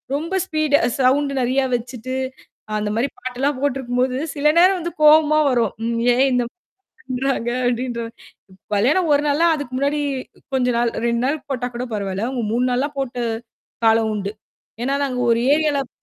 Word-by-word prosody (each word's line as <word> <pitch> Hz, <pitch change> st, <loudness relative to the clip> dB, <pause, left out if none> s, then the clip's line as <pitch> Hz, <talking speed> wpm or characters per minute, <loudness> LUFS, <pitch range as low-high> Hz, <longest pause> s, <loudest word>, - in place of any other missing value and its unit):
ரொம்ப 335 Hz, +6 st, -3 dB
ஸ்பீடு 310 Hz, -4 st, +1 dB
அ -, -, +2 dB
சவுண்டு 275 Hz, +2 st, +3 dB
நெறையா 260 Hz, +2 st, +1 dB
வச்சுட்டு, 250 Hz, +1 st, -5 dB, 0.6 s
அந்த 210 Hz, 0 st, -2 dB
மாரி 245 Hz, +5 st, +1 dB
பாட்டு 250 Hz, 0 st, -6 dB
எல்லாம் 275 Hz, -1 st, 0 dB
போட்டு 280 Hz, -1 st, 0 dB
இருக்கும்போது, 250 Hz, 0 st, -1 dB, 0.2 s
சில 290 Hz, +1 st, +1 dB
நேரம் 365 Hz, -1 st, +4 dB, 0.2 s
கோவமா 305 Hz, 0 st, +6 dB
வரும். 235 Hz, -5 st, +1 dB
ம் 230 Hz, 0 st, -1 dB
ஏன் 260 Hz, +2 st, +3 dB
இந்தம் 245 Hz, -1 st, 0 dB, 0.6 s
பண்றாங்க? 255 Hz, -2 st, -1 dB, 0.2 s
அப்டின்ற 245 Hz, -1 st, -2 dB
மாரி 195 Hz, -4 st, -19 dB, 0.2 s
கல்யாணம் 300 Hz, -, +2 dB
ஒரு 285 Hz, -, +3 dB
நாள்ன்னா, 300 Hz, +4 st, +3 dB
அதுக்கு 280 Hz, -4 st, -6 dB
முன்னாடி 285 Hz, +2 st, 0 dB, 0.5 s
கொஞ்ச 250 Hz, -1 st, +1 dB
நாள் 235 Hz, -1 st, +1 dB, 0.2 s
2 235 Hz, 0 st, 0 dB
நாள் 290 Hz, +1 st, -1 dB
போட்டா 250 Hz, -2 st, -2 dB
கூடப் 240 Hz, -2 st, -4 dB
பரவால்லை. 200 Hz, +1 st, -2 dB
அவுங்க 250 Hz, -3 st, -3 dB
3 245 Hz, +2 st, +1 dB
நாள்லாம் 280 Hz, +4 st, -1 dB
போட்டு 245 Hz, -2 st, -3 dB, 0.6 s
காலம் 225 Hz, 0 st, +4 dB
உண்டு. 200 Hz, 0 st, -4 dB, 0.5 s
ஏன்னா 270 Hz, +3 st, 0 dB
நாங்க 255 Hz, -2 st, -3 dB
ஒரு 230 Hz, -, +3 dB
ஏரியாலப் 290 Hz, -3 st, +1 dB
255 Hz, 165 wpm, -21 LUFS, 235-285 Hz, 0.6 s, கோவமா